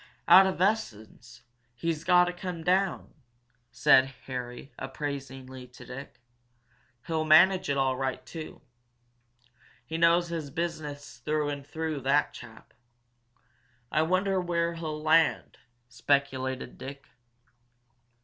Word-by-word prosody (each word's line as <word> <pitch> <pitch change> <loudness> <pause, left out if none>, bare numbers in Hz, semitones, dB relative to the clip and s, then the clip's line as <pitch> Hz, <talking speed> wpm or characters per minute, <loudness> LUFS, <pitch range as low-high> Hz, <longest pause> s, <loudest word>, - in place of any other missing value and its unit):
"Out 190 +1 +8
of 190 - -3
essense 120 - -2 0.3
he's 165 +4 -3
got 180 0 +5
to 175 - -3
come 175 -2 -6
down," 185 +1 0 0.6
said 130 +2 +4
Harry, 125 +1 -7
appraisingly, 135 -2 -6
to 125 - -14
Dick. 130 +1 -10 0.9
"He'll 160 -1 -1
manage 175 +3 +5
it 140 - 0
all 135 -1 +1
right, 130 0 -3
too. 160 -3 -9 1.2
He 160 +1 -4
knows 170 +1 +4
his 160 -4 -4
business 150 -4 -5
through 150 +3 -1
and 140 -1 -6
through, 160 -1 -4
that 140 +3 +2
chap." 115 -2 -13 1.2
"I 155 - +2
wonder 185 +3 +1
where 170 -1 -1
he'll 160 -2 -5
land," 160 0 +2 0.3
speculated 130 0 -1
Dick. 140 +1 -9
150 Hz, 115 wpm, -28 LUFS, 130-170 Hz, 1.2 s, Out